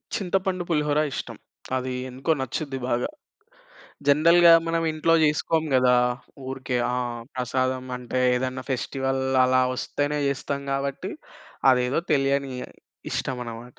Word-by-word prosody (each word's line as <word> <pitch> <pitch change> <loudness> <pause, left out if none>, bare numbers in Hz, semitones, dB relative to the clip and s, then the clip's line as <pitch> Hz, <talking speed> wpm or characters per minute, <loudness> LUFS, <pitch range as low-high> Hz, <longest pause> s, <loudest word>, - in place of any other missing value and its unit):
చింతపండు 185 -1 -1
పులిహోర 150 -2 +1
ఇష్టం. - - -5 0.4
అది 130 0 -3 0.2
ఎందుకో 130 +5 -2
నచ్చుద్ది 135 +1 -3
బాగా. 120 -1 0 1.0
జనరల్‌గా 170 +4 +6
మనం 165 0 0
ఇంట్లో 155 +1 +2
జేసుకోం 160 +1 +1
గదా! 125 -1 +5 0.5
ఊరికే. 130 -1 -2
ఆ! - - 0 0.4
ప్రసాదం 130 +1 -1
అంటే 125 +1 -3
ఏదన్నా 130 +1 -2
ఫెస్టివల్ 135 +1 -1 0.2
అలా 130 0 +3
వస్తేనే 145 +3 -2
జేస్తాం 140 +1 -2
కాబట్టి 135 0 -3 0.6
అదేదో 125 +4 +1
తెలియని 140 -1 +1 0.6
ఇష్టం 130 -2 -2
అన్నమాట. 120 +2 -9
135 Hz, 115 wpm, -25 LUFS, 130-150 Hz, 1.0 s, జనరల్‌గా